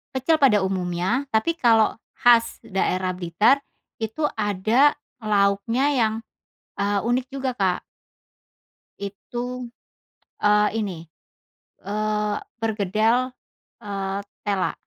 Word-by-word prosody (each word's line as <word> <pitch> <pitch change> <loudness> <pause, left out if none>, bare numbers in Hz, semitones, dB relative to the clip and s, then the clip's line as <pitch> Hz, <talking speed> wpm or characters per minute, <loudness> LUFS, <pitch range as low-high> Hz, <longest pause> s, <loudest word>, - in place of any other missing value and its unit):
Kecil 310 +5 +2
pada 210 -8 +5
umumnya, 190 +7 -1
tapi 325 +10 +1
kalau 225 -3 +4 0.2
khas 235 -1 +4
daerah 185 -3 -1
Blitar 185 +9 +2 0.4
itu, 220 +8 -3
ada 215 +7 +3 0.2
lauknya 210 +4 +1
yang, 230 -6 +2 0.7
eee, 200 0 +1
unik 245 +3 0
juga 270 -1 -2
Kak. 185 -3 0 1.2
Itu, 240 +5 -6 0.7
eee, 210 0 +4
ini, 175 -7 -4 0.7
eee, 210 +1 -1 0.3
perkedel, 220 +4 +1 0.5
eee, 195 -1 -3 0.3
tela. 200 -2 0
215 Hz, 95 wpm, -23 LUFS, 195-240 Hz, 1.2 s, pada